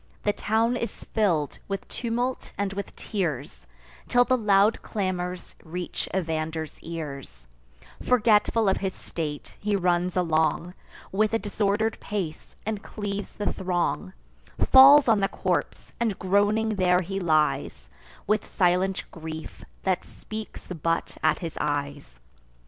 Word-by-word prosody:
The 205 Hz, -, +2 dB
town 225 Hz, +4 st, +1 dB
is 235 Hz, -, -5 dB
fill'd 170 Hz, -9 st, +1 dB
with 195 Hz, -1 st, -4 dB
tumult 245 Hz, +2 st, -3 dB
and 200 Hz, -1 st, -1 dB
with 200 Hz, 0 st, -6 dB
tears, 150 Hz, -, -3 dB, 0.4 s
Till 245 Hz, -, +5 dB
the 255 Hz, -, +2 dB
loud 210 Hz, -2 st, +3 dB
clamours 185 Hz, -3 st, -3 dB
reach 175 Hz, +2 st, -5 dB
Evander's 160 Hz, -3 st, -2 dB
ears: 140 Hz, -, -7 dB, 0.6 s
Forgetful 225 Hz, -2 st, +3 dB
of 190 Hz, -, +3 dB
his 190 Hz, -1 st, -3 dB
state, 150 Hz, -3 st, -5 dB
he 210 Hz, 0 st, 0 dB
runs 180 Hz, -1 st, +1 dB
along, 165 Hz, 0 st, +1 dB, 0.4 s
With 215 Hz, +3 st, +2 dB
a -, -, +4 dB
disorder'd 210 Hz, +1 st, 0 dB
pace, 190 Hz, -7 st, -5 dB
and 215 Hz, -1 st, -2 dB
cleaves 205 Hz, -2 st, -5 dB
the 205 Hz, -, -1 dB
throng; 175 Hz, -, -1 dB, 0.6 s
Falls 275 Hz, +2 st, +9 dB
on 220 Hz, -3 st, +5 dB
the 195 Hz, -, +2 dB
corpse; -, -, -2 dB
and 225 Hz, -5 st, 0 dB
groaning 205 Hz, +4 st, +2 dB
there 185 Hz, -3 st, +3 dB
he 195 Hz, +2 st, -3 dB
lies, 155 Hz, -, +1 dB, 0.4 s
With 215 Hz, +2 st, +1 dB
silent 185 Hz, +1 st, +1 dB
grief, 160 Hz, -1 st, -8 dB, 0.2 s
that 190 Hz, -2 st, +1 dB
speaks 215 Hz, -3 st, -9 dB
but 165 Hz, 0 st, -1 dB
at 155 Hz, -1 st, +3 dB
his 165 Hz, -, -5 dB
eyes. 145 Hz, -, -3 dB
190 Hz, 130 wpm, -26 LUFS, 165-210 Hz, 0.6 s, Falls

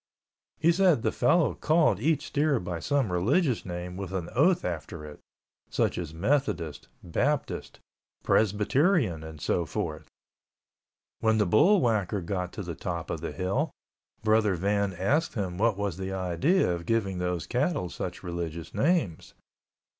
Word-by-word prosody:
He 165 Hz, +2 st, +4 dB
said 175 Hz, -8 st, +3 dB
the -, -, +2 dB
fellow 155 Hz, +5 st, +3 dB
called 155 Hz, -, +2 dB
each 150 Hz, +4 st, +1 dB
steer 145 Hz, -3 st, +1 dB
by 90 Hz, -3 st, -4 dB
some 135 Hz, +1 st, 0 dB
religious 120 Hz, -, +1 dB
name 90 Hz, 0 st, -5 dB
with 95 Hz, -1 st, -5 dB
an 90 Hz, -3 st, -3 dB
oath 170 Hz, +7 st, +3 dB
after 80 Hz, -2 st, -5 dB
it, 75 Hz, -1 st, -10 dB, 0.5 s
such -, -, +1 dB
as 85 Hz, -4 st, -5 dB
Methodist, 90 Hz, -, -1 dB, 0.2 s
Baptist, 85 Hz, -, -2 dB, 0.4 s
Presbyterian, 110 Hz, -, +2 dB
and 80 Hz, -1 st, -9 dB
so 85 Hz, -, 0 dB
forth. 75 Hz, +1 st, -4 dB, 1.1 s
When 110 Hz, -1 st, +2 dB
the 105 Hz, -, +3 dB
bull 180 Hz, -, +5 dB
whacker 105 Hz, -5 st, +1 dB
got 90 Hz, 0 st, -3 dB
to 105 Hz, -, -5 dB
the 85 Hz, -1 st, -5 dB
top 85 Hz, 0 st, -4 dB
of 80 Hz, -, -4 dB
the 85 Hz, -, -4 dB
hill, 90 Hz, +1 st, -1 dB, 0.5 s
Brother 110 Hz, -2 st, +3 dB
Van 100 Hz, +2 st, 0 dB
asked 125 Hz, -, 0 dB
him 95 Hz, -4 st, -3 dB
what 110 Hz, -2 st, +2 dB
was 100 Hz, -4 st, -2 dB
the 95 Hz, 0 st, -4 dB
idea 95 Hz, -, +1 dB
of 85 Hz, -1 st, -6 dB
giving 100 Hz, -5 st, 0 dB
those 90 Hz, -1 st, -2 dB
cattle 140 Hz, -, 0 dB
such 90 Hz, +1 st, -6 dB
religious 85 Hz, -2 st, -5 dB
names. 145 Hz, -, 0 dB
100 Hz, 150 wpm, -28 LUFS, 85-135 Hz, 1.1 s, bull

